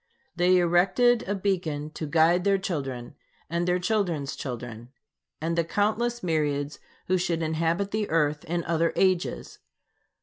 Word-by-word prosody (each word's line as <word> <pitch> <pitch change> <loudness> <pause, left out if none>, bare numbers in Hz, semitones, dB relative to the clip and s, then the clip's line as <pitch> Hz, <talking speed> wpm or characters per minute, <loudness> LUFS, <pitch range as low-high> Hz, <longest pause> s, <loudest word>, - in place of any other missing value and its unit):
They 180 +1 +4
erected 185 +8 +3
a 205 - +1
beacon 170 -7 -2
to 155 - -5
guide 170 +3 +3
their 200 0 +3
children, 135 -10 -4 0.4
and 170 +1 0
their 180 0 +3
children's 175 -7 -1
children, 120 -2 -6 0.5
and 165 +2 -1
the 170 - +2
countless 220 +6 0
myriads 150 -4 -1 0.3
who 185 0 +1
should 170 -2 -1
inhabit 165 +5 0
the 215 -1 -1
earth 150 -1 +1
in 170 0 -2
other 165 0 +1
ages. 185 -2 0
170 Hz, 140 wpm, -26 LUFS, 155-190 Hz, 0.5 s, They